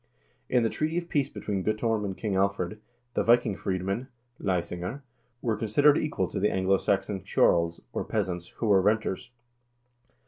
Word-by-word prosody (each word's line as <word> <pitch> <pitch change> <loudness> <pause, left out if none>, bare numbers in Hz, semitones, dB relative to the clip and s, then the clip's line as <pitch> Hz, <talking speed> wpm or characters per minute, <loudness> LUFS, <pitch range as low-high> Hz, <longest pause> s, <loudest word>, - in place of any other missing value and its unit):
In 125 - +3
the 115 - +2
treaty 155 +2 -1
of 175 -1 -3
peace 140 -2 +1
between 100 -8 -3
Guttorm 110 +1 0
and 95 -2 -4
King 105 -4 -2
Alfred, 100 +1 0 0.3
the - - +1
Viking 115 -3 +4
freedmen 95 +7 -2 0.3
(leisinger) 90 +7 -2 0.4
were 115 -3 +1
considered 140 +8 +4
equal 120 -14 0
to - - -3
the 105 +2 +3
Anglo 95 +1 +2
Saxon 95 -1 0
ceorls, 85 0 +2
or - - -1
peasants, 90 -5 -2
who - - -2
were 100 -3 +5
renters. 105 +2 0
105 Hz, 160 wpm, -28 LUFS, 95-115 Hz, 0.4 s, were